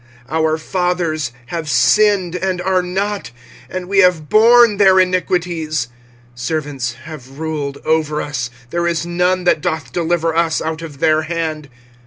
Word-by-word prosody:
25:005:007 -, -, -2 dB
Our 160 Hz, 0 st, +1 dB
fathers 170 Hz, -4 st, -1 dB
have 165 Hz, +1 st, -5 dB
sinned, 190 Hz, -, +3 dB
and 185 Hz, 0 st, -2 dB
are 185 Hz, -1 st, +2 dB
not; 195 Hz, -3 st, -3 dB, 0.4 s
and 185 Hz, -1 st, -5 dB
we 195 Hz, +1 st, +2 dB
have 180 Hz, -5 st, +3 dB
borne 230 Hz, 0 st, +6 dB
their 190 Hz, -2 st, +5 dB
iniquities. 175 Hz, -6 st, 0 dB, 0.5 s
25:005:008 -, -, -15 dB
Servants 140 Hz, -3 st, -3 dB
have 135 Hz, -3 st, -11 dB
ruled 150 Hz, -3 st, -3 dB
over 155 Hz, -1 st, +1 dB
us: 125 Hz, -5 st, -3 dB, 0.2 s
there 170 Hz, 0 st, 0 dB
is 170 Hz, -1 st, -1 dB
none 180 Hz, +1 st, 0 dB
that 175 Hz, -3 st, +2 dB
doth 160 Hz, -7 st, -3 dB
deliver 165 Hz, 0 st, 0 dB
us 165 Hz, -1 st, +1 dB
out 160 Hz, 0 st, -4 dB
of 150 Hz, -3 st, -10 dB
their 155 Hz, -1 st, +3 dB
hand. 155 Hz, -2 st, -4 dB
165 Hz, 155 wpm, -17 LUFS, 155-180 Hz, 0.5 s, borne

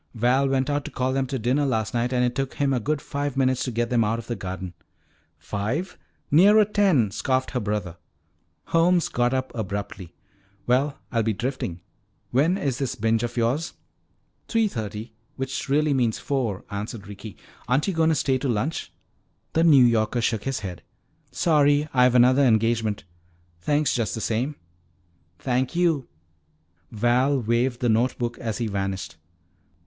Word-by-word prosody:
Val 125 Hz, +4 st, +2 dB
went 135 Hz, 0 st, +1 dB
out 145 Hz, -1 st, -1 dB
to -, -, -6 dB
call 130 Hz, 0 st, -1 dB
them 135 Hz, 0 st, 0 dB
to 135 Hz, +1 st, -3 dB
dinner 125 Hz, +5 st, +1 dB
last 110 Hz, -6 st, -1 dB
night 120 Hz, +1 st, 0 dB
and 125 Hz, -1 st, +2 dB
it 125 Hz, -, -1 dB
took 135 Hz, 0 st, -3 dB
him 140 Hz, -1 st, +1 dB
a 125 Hz, -, +1 dB
good 150 Hz, +6 st, -1 dB
five 140 Hz, -1 st, -4 dB
minutes 130 Hz, -1 st, +2 dB
to -, -, -2 dB
get 120 Hz, 0 st, -2 dB
them 120 Hz, -2 st, +3 dB
out 110 Hz, +2 st, 0 dB
of 115 Hz, -, -7 dB
the 120 Hz, -, -3 dB
garden." 95 Hz, -2 st, -6 dB, 0.6 s
"Five? 125 Hz, -, -3 dB, 0.4 s
Nearer 205 Hz, +8 st, +6 dB
ten," 190 Hz, -, +2 dB
scoffed 130 Hz, +4 st, -1 dB
her 125 Hz, -, -1 dB
brother. 105 Hz, -5 st, -3 dB, 0.7 s
Holmes 170 Hz, +1 st, +3 dB
got 120 Hz, 0 st, +1 dB
up 130 Hz, 0 st, -2 dB
abruptly. 100 Hz, -5 st, -5 dB, 0.5 s
"Well, 135 Hz, +4 st, +1 dB
I'll 115 Hz, -2 st, +1 dB
be 110 Hz, 0 st, 0 dB
drifting. 110 Hz, -7 st, -4 dB, 0.5 s
When 155 Hz, +9 st, +2 dB
is 135 Hz, -8 st, -2 dB
this 135 Hz, -3 st, -2 dB
binge 115 Hz, 0 st, +1 dB
of 120 Hz, 0 st, -4 dB
yours?" 125 Hz, +8 st, 0 dB, 0.7 s
"Three 225 Hz, -2 st, +2 dB
thirty, 110 Hz, -, -6 dB, 0.2 s
which 135 Hz, 0 st, -4 dB
really 150 Hz, +1 st, +2 dB
means 120 Hz, -4 st, +1 dB
four," 120 Hz, -9 st, -2 dB
answered 105 Hz, +1 st, -5 dB
Ricky. 105 Hz, 0 st, -9 dB, 0.3 s
"Aren't 130 Hz, -, +1 dB
you 195 Hz, -, 0 dB
going 160 Hz, -1 st, +2 dB
to 160 Hz, -, +2 dB
stay 130 Hz, -2 st, +1 dB
to 135 Hz, -, -2 dB
lunch?" 125 Hz, +8 st, -2 dB, 0.6 s
The 165 Hz, -, +3 dB
New 145 Hz, -7 st, +7 dB
Yorker 115 Hz, 0 st, +2 dB
shook 115 Hz, -2 st, -1 dB
his 135 Hz, -5 st, -2 dB
head. 90 Hz, -4 st, -6 dB, 0.5 s
"Sorry, 145 Hz, -2 st, +3 dB
I've 125 Hz, -1 st, +4 dB
another 125 Hz, +3 st, +5 dB
engagement. 110 Hz, -3 st, +1 dB, 0.6 s
Thanks 145 Hz, -, +1 dB
just 115 Hz, -4 st, -1 dB
the -, -, -4 dB
same." 125 Hz, +8 st, -1 dB, 0.8 s
"Thank 130 Hz, -, -1 dB
you!" 165 Hz, -7 st, +1 dB, 0.8 s
Val 125 Hz, +5 st, +2 dB
waved 120 Hz, +2 st, 0 dB
the 125 Hz, -, +1 dB
note 115 Hz, +4 st, +2 dB
book 120 Hz, -1 st, -3 dB
as 110 Hz, -3 st, -3 dB
he 120 Hz, -, -2 dB
vanished. 95 Hz, -5 st, -3 dB
125 Hz, 170 wpm, -24 LUFS, 110-140 Hz, 0.8 s, New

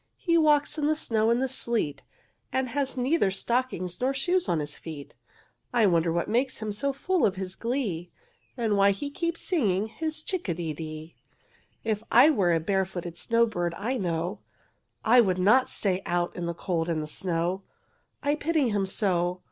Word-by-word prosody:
he 335 Hz, -2 st, +1 dB
walks 300 Hz, -1 st, +3 dB
in 295 Hz, -, +1 dB
the 310 Hz, -, +2 dB
snow 225 Hz, -7 st, +1 dB
and 235 Hz, +2 st, +2 dB
the -, -, +1 dB
sleet 230 Hz, -, -1 dB, 0.5 s
And 260 Hz, -1 st, 0 dB
has 270 Hz, +1 st, -2 dB
neither 255 Hz, -3 st, +2 dB
stockings 200 Hz, -3 st, -1 dB
nor 265 Hz, +2 st, +1 dB
shoes 355 Hz, +6 st, +1 dB
on 170 Hz, -, +2 dB
his 150 Hz, -1 st, -3 dB
feet, 150 Hz, -4 st, -9 dB, 0.6 s
I 230 Hz, -3 st, +5 dB
wonder 170 Hz, -3 st, +3 dB
what 170 Hz, +1 st, -1 dB
makes 250 Hz, +4 st, 0 dB
him 215 Hz, -1 st, -4 dB
so 275 Hz, +7 st, -1 dB
full 355 Hz, +6 st, 0 dB
of 195 Hz, -, +3 dB
his 190 Hz, 0 st, -5 dB
glee, 220 Hz, -9 st, -2 dB, 0.5 s
And 225 Hz, -4 st, +1 dB
why 200 Hz, 0 st, +5 dB
he 285 Hz, +6 st, -4 dB
keeps 335 Hz, +1 st, -2 dB
singing, 210 Hz, -, +1 dB
his 315 Hz, +5 st, -3 dB
chick 370 Hz, -, -3 dB
a 170 Hz, -, 0 dB
de 165 Hz, -2 st, -3 dB
dee. 155 Hz, +1 st, -8 dB, 0.7 s
"If 215 Hz, -2 st, -1 dB
I 260 Hz, +7 st, +7 dB
were 190 Hz, -, +2 dB
a 165 Hz, -, +3 dB
barefooted 180 Hz, -1 st, -2 dB
snowbird, 220 Hz, -7 st, +1 dB
I 245 Hz, +8 st, -2 dB
know, 175 Hz, 0 st, -2 dB, 0.7 s
I 245 Hz, +3 st, +7 dB
would 185 Hz, -5 st, +1 dB
not 215 Hz, +8 st, +4 dB
stay 190 Hz, -2 st, 0 dB
out 175 Hz, 0 st, 0 dB
in 175 Hz, -1 st, -3 dB
the 170 Hz, -, -3 dB
cold 170 Hz, -2 st, -2 dB
and 155 Hz, -2 st, -1 dB
the -, -, -4 dB
snow. 175 Hz, +3 st, -1 dB, 0.6 s
I 285 Hz, +1 st, +2 dB
pity 300 Hz, -3 st, +1 dB
him 200 Hz, -2 st, 0 dB
so! 180 Hz, -3 st, 0 dB
210 Hz, 185 wpm, -27 LUFS, 175-265 Hz, 0.7 s, I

